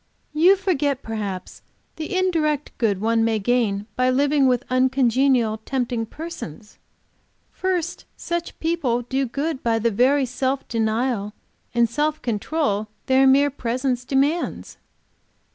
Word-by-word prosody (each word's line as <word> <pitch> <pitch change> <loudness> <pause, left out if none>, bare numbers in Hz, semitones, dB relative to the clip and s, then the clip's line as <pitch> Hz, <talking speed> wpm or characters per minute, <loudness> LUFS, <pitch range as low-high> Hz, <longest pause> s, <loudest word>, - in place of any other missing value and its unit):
"You 345 +6 +6
forget 300 -8 -1
perhaps 205 -4 -5 0.4
the 320 +5 -3
indirect 310 -6 0
good 205 -5 +1
one 225 +2 +2
may 225 0 +2
in 210 -2 0
by 255 0 +2
living 280 +1 +3
with 250 -1 +2
uncongenial, 255 -2 +2
tempting 245 -3 -2
persons. 215 - -9 0.7
First 370 -3 -2
such 345 0 -4
people 295 -8 0
do 265 +2 -1
good 285 +3 -3
by 230 -1 +1
the 230 +1 +1
very 260 +6 +3
self 260 +2 -2
denial 220 -1 -1 0.4
and 235 0 +4
self 300 +5 -1
control 220 -1 -1 0.2
their 265 +1 +4
mere 280 +2 +5
presence 250 0 -2
demands. 280 +6 -1
260 Hz, 125 wpm, -22 LUFS, 230-295 Hz, 0.7 s, You